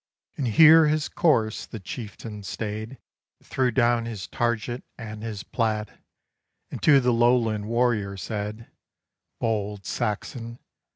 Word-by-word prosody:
And 135 - -2
here 160 +7 +7
his 155 0 +1
course 115 -10 +1
the 110 - -8
Chieftain 105 +1 -7
staid, 110 +5 -5 0.5
Threw 130 -1 0
down 120 -1 +2
his 110 -5 -5
target 120 +1 -2
and 110 -2 -8
his 110 -3 -5
plaid, 110 -3 -2 0.7
And - - -6
to 145 -3 +6
the 125 -1 +2
Lowland 115 -3 +2
warrior 115 -4 0
said 105 +3 -5 0.7
"Bold 105 -3 -2
Saxon! 115 +2 -3
115 Hz, 120 wpm, -25 LUFS, 105-120 Hz, 0.7 s, here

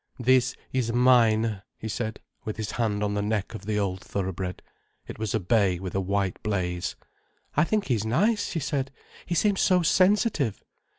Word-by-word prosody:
"This 125 +1 +3 0.2
is 125 -3 0
mine," 115 -4 +4 0.2
he 110 - -6
said, 110 0 -4 0.2
with 110 - -5
his 110 -2 -3
hand 105 -3 -1
on 105 0 0
the 105 - 0
neck 105 +1 -2
of 105 -2 -8
the 105 -1 0
old 95 -2 -1
thoroughbred. 95 -2 -4 0.4
It - - -9
was 110 -1 -1
a - - +2
bay 100 -2 +2
with 90 0 -6
a 95 - 0
white 95 -1 -1
blaze. 90 -4 -2 0.6
"I 150 - +4
think 210 +2 0
he's 115 - 0
nice," 205 - +1
she 165 - -2
said. 135 -2 -2 0.4
"He 175 - -1
seems 200 +2 +2
so 180 -2 +4
sensitive." 185 - +2
110 Hz, 180 wpm, -26 LUFS, 100-130 Hz, 0.6 s, mine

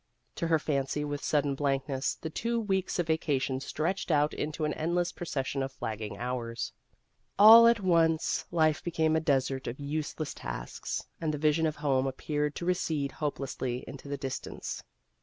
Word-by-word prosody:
To 170 - -1
her 165 -1 +4
fancy 150 -1 -1
with 145 -1 -4
sudden 145 -2 +1
blankness, 135 -1 -1
the 160 - -6
two 235 +8 -1
weeks 195 -4 -1
of 175 - +1
vacation 145 -4 0
stretched 165 +8 -2
out 150 -1 +3
into 155 +1 -2
an 150 - 0
endless 175 +2 0
procession 140 -5 -3
of 135 0 -2
flagging 110 -4 -5
hours. 120 -2 -3 0.6
All 225 +3 +10
at 235 -2 +4
once, 165 -3 +2
life 155 -3 +2
became 160 -2 +1
a - - +4
desert 135 -3 0
of 120 +4 -5
useless 150 +1 -3
tasks, - - -5 0.2
and 160 -2 0
the 150 - -2
vision 155 +2 +2
of 155 - -2
home 135 -2 +1
appeared 150 +2 -2
to 170 - -4
recede 160 -6 0
hopelessly 135 -4 -3
into 140 +1 -9
the 140 0 -3
distance. 135 -1 -5
150 Hz, 165 wpm, -30 LUFS, 135-160 Hz, 0.6 s, All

